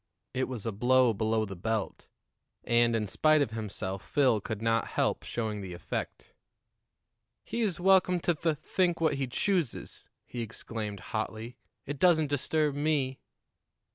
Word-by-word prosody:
It 130 0 0
was 120 -5 -5
a 115 - 0
blow 125 +3 +4
below 110 +1 +1
the 100 -2 -7
belt, 110 +3 -3 0.6
and, 120 0 +3
in 110 -1 0
spite 155 +9 +3
of 110 - -4
himself, 100 -3 -4
Phil 130 -7 +2
could 110 0 -4
not 115 0 +1
help - - 0
showing 110 -3 -3
the 95 -2 -6
effect. 85 - -5 1.1
"He's 215 -8 -1
welcome 185 -1 +4
to 175 - +2
th 160 -1 -1
think 175 +3 0
what 160 -2 +2
he 135 - 0
chooses," 170 - -2 0.2
he 120 - -5
exclaimed 110 -3 -5
hotly; 110 +3 -4 0.3
"it 145 0 -5
doesn't 160 -5 +4
disturb 150 +1 +1
me." 145 -3 0
125 Hz, 145 wpm, -30 LUFS, 110-155 Hz, 1.1 s, blow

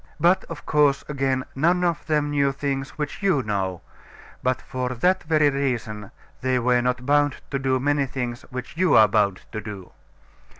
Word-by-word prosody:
But, 180 +3 +3
of 165 -3 -9
course, 145 -2 +3
again, 135 -2 -1
none 175 +6 +2
of 170 -3 -1
them 150 -1 +1
knew 140 -1 +2
things 135 -1 -3
which 150 +4 -4
you 190 -9 +2
know; 95 -4 -2 0.6
but 130 0 0
for 130 -1 -4
that 185 +9 +2
very 155 -2 +3
reason 115 -7 -2 0.3
they 130 0 +1
were 125 0 +2
not 125 0 -1
bound 145 0 +3 0.2
to 135 - -1
do 130 -1 +1
many 145 +1 +1
things 125 -1 -4
which 125 +1 -7
you 185 +1 +3
are 110 - +8
bound 100 -2 +1
to 110 - -4
do. 100 -3 -9
135 Hz, 175 wpm, -24 LUFS, 125-150 Hz, 0.6 s, are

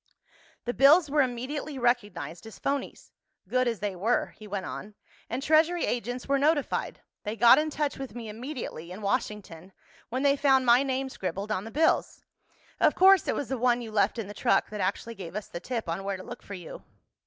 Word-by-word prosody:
"The 245 - -1
bills 290 +4 +6
were 300 0 +4
immediately 265 +3 -3
recognized 215 - -1
as 220 - -11
phonies—good 255 -3 -3
as 230 -4 -2
they 205 -2 -2
were," 220 +7 0
he 215 - -12
went 200 -1 -4
on, 210 0 -7 0.3
"and 250 +4 -3
Treasury 320 +3 +3
agents 245 +1 -3
were 275 0 +2
notified. 290 0 0 0.2
They 210 +1 -3
got 235 +4 +7
in 310 +1 0
touch 295 -2 -2
with 265 -5 -7
me 235 -2 -6
immediately, 225 - -6
in 200 +3 -8
Washington, 200 -5 -3 0.4
when 255 +3 -2
they 280 0 +4
found 270 -2 +3
my 240 +1 +6
name 270 -1 -1
scribbled 195 -1 -4
on 195 -1 -1
the - - -6
bills. 315 +7 +1 0.5
Of - - +4
course 385 -1 +6
it - - +1
was 280 - -3
the 265 -2 -2
one 245 0 +2
you 225 - -8
left 210 +2 +2
in 225 - -3
the 205 - -8
truck - - +1
that 210 -1 -4
actually 200 +5 -2
gave 185 -4 -9
us 210 - -3
the 170 - -6
tip 230 +2 -4
on 170 +4 -3
where 195 -1 -2
to 185 - -9
look - - -9
for 200 - -8
you." 175 -3 -9
240 Hz, 205 wpm, -28 LUFS, 205-275 Hz, 0.5 s, got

